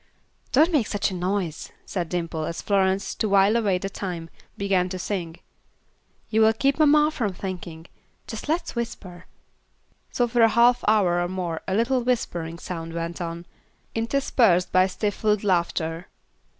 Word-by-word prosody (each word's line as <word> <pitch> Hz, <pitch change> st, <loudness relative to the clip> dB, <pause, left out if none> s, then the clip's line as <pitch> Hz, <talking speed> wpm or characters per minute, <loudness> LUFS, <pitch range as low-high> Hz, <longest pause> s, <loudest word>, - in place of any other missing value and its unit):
"Don't 315 Hz, +6 st, +4 dB
make 285 Hz, -10 st, +2 dB
such 205 Hz, -1 st, -1 dB
a -, -, -5 dB
noise," 180 Hz, -2 st, -2 dB
said 175 Hz, -4 st, -3 dB
Dimple, 165 Hz, -3 st, -3 dB
as 170 Hz, -, -4 dB
Florence, 195 Hz, -1 st, +1 dB
to 215 Hz, -, -1 dB
while 200 Hz, +2 st, +4 dB
away 205 Hz, -5 st, +2 dB
the 195 Hz, -, -4 dB
time, 175 Hz, -4 st, -6 dB, 0.3 s
began 190 Hz, -2 st, +1 dB
to 185 Hz, -, -4 dB
sing; 175 Hz, -3 st, -4 dB, 1.0 s
"you 220 Hz, 0 st, +3 dB
will 220 Hz, 0 st, +5 dB
keep 275 Hz, +6 st, +1 dB
mamma 300 Hz, 0 st, +5 dB
from 225 Hz, -10 st, -2 dB
thinking. 175 Hz, -3 st, -7 dB, 0.4 s
Just 225 Hz, +5 st, -7 dB
let's 325 Hz, -2 st, -1 dB
whisper." 185 Hz, -7 st, -6 dB, 0.8 s
So 245 Hz, -, +1 dB
for 240 Hz, 0 st, +1 dB
a 225 Hz, -, +7 dB
half 240 Hz, +3 st, +4 dB
hour 190 Hz, -5 st, +3 dB
or 175 Hz, -, 0 dB
more 175 Hz, -3 st, -3 dB
a 190 Hz, -, 0 dB
little 245 Hz, +4 st, +2 dB
whispering 175 Hz, -9 st, -2 dB
sound 165 Hz, -2 st, -6 dB
went 170 Hz, +1 st, -4 dB
on, 170 Hz, 0 st, -5 dB, 0.5 s
interspersed 225 Hz, -6 st, +2 dB
by 185 Hz, 0 st, +4 dB
stifled 210 Hz, +1 st, -1 dB
laughter. 170 Hz, -2 st, 0 dB
195 Hz, 155 wpm, -24 LUFS, 175-225 Hz, 1.0 s, a